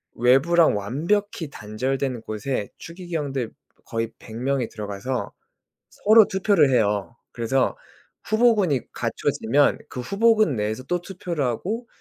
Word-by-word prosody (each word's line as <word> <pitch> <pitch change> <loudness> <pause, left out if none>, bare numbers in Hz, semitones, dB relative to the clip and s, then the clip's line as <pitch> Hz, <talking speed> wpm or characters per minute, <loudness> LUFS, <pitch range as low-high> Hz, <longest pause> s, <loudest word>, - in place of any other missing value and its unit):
외부랑 135 +6 +4
완벽히 165 - -1
단절된 125 +3 -3
곳에 110 0 -3
추기경들 160 -8 -4 0.3
거의 115 0 -3
100 110 - -11
명이 130 0 -1
들어가서 105 +4 -4 0.6
서로 215 +1 +5
투표를 190 -6 +3
해요. 105 -2 +1 0.2
그래서 125 +3 0 0.5
후보군이 215 - +3
갖춰지면 140 +6 +1
그 125 - -7
후보군 215 - +3
내에서 110 +4 -2
또 175 +5 -2
투표를 175 -4 -4
하고 205 - -3
135 Hz, 270 characters per minute, -24 LUFS, 115-180 Hz, 0.6 s, 서로